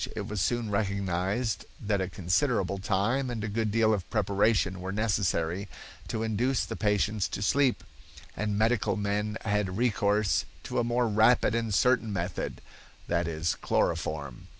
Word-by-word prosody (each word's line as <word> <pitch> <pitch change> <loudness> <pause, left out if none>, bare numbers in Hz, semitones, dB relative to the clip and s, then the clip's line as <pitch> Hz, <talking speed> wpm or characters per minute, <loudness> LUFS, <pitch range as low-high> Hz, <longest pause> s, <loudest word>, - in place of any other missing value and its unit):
It - - -4
was 105 -3 -2
soon 120 -1 0
recognized 100 +2 -1 0.2
that 100 -2 0
a 95 - -2
considerable 100 - 0
time 115 +8 0
and 115 -3 -4
a - - -1
good 110 +1 -1
deal 110 0 +3
of 100 -4 -3
preparation 100 -2 +1
were 95 +1 -4
necessary 100 -3 0 0.4
to 110 - -2
induce 120 +4 0
the - - -5
patients 105 -1 +1
to 100 - -3
sleep, 140 +3 +2 0.5
and 105 -1 -1
medical 110 +1 +2
men 105 +1 -1
had 105 -3 -1
recourse 105 -3 +2 0.2
to - - -2
a - - +2
more 120 +1 +1
rapid 110 +3 +4
and 115 -1 -1
certain 115 +1 +3
method; 90 -2 -3 0.5
that 85 -1 0
is, 80 0 -1
chloroform. 70 -5 -1
105 Hz, 150 wpm, -28 LUFS, 95-115 Hz, 0.5 s, rapid